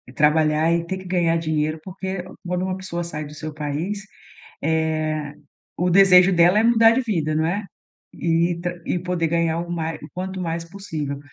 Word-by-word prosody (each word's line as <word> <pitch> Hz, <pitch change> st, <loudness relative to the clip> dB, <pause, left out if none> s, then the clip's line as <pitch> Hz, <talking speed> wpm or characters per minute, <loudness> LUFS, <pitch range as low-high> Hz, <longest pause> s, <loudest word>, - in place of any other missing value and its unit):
trabalhar, 155 Hz, +1 st, +3 dB
e 170 Hz, 0 st, +1 dB
ter 190 Hz, +2 st, -3 dB
que 185 Hz, -, -11 dB
ganhar 175 Hz, -2 st, +1 dB
dinheiro, 155 Hz, -1 st, -1 dB
porque 190 Hz, -1 st, -5 dB, 0.2 s
quando 180 Hz, 0 st, -1 dB
uma 185 Hz, 0 st, -2 dB
pessoa 180 Hz, -2 st, -4 dB
sai 155 Hz, -3 st, -5 dB
do 145 Hz, -, -10 dB
seu 155 Hz, 0 st, -6 dB
país, 155 Hz, +8 st, -3 dB, 0.6 s
eh, 155 Hz, -1 st, -1 dB, 0.4 s
o 180 Hz, +1 st, +1 dB
desejo 185 Hz, 0 st, +7 dB
dela 175 Hz, +3 st, +5 dB
é 220 Hz, -, +4 dB
mudar 230 Hz, -1 st, +6 dB
de 260 Hz, -, +1 dB
vida, 165 Hz, -10 st, -1 dB
não 155 Hz, +1 st, +1 dB
é? 200 Hz, +5 st, -1 dB, 0.5 s
E 170 Hz, +1 st, +1 dB
tam 175 Hz, 0 st, -1 dB
e 180 Hz, -, 0 dB
poder 180 Hz, -1 st, -1 dB
ganhar 165 Hz, 0 st, +1 dB
o 175 Hz, -, -6 dB
ma 165 Hz, -1 st, -2 dB
o 150 Hz, -, -11 dB
quanto 185 Hz, +1 st, -4 dB
mais 165 Hz, -1 st, -3 dB
possível, 160 Hz, -6 st, -5 dB
170 Hz, 185 wpm, -22 LUFS, 155-185 Hz, 0.6 s, desejo